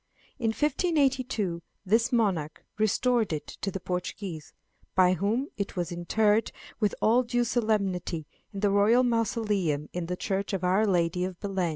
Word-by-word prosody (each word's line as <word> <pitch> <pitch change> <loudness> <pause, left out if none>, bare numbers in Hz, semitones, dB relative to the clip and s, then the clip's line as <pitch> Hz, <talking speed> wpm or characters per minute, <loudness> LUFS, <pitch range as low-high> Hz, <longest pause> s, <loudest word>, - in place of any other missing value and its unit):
In 230 - 0
1582 265 - +1 0.2
this 225 +5 +2
monarch 190 -11 0
restored 225 +1 +2
it 155 -2 -3 0.2
to 195 - -1
the 195 - -4
Portuguese, 180 -2 -5 0.4
by 185 -1 +5
whom 220 +9 0
it 200 -1 -3
was 175 -1 -2
interred 210 +5 +1 0.3
with 210 -3 +1
all 235 +3 +5
due 245 0 0
solemnity 200 -9 -1 0.3
in 200 -2 -6
the 205 -1 +3
royal 210 +5 +4
mausoleum 210 - 0
in 175 -1 -3
the 180 +1 -3
church 195 +2 -2
of 190 -2 -2
Our 190 +4 +3
Lady 180 -1 +1
of 185 -1 -4
Belem. 195 -4 -1
200 Hz, 155 wpm, -28 LUFS, 180-230 Hz, 0.4 s, by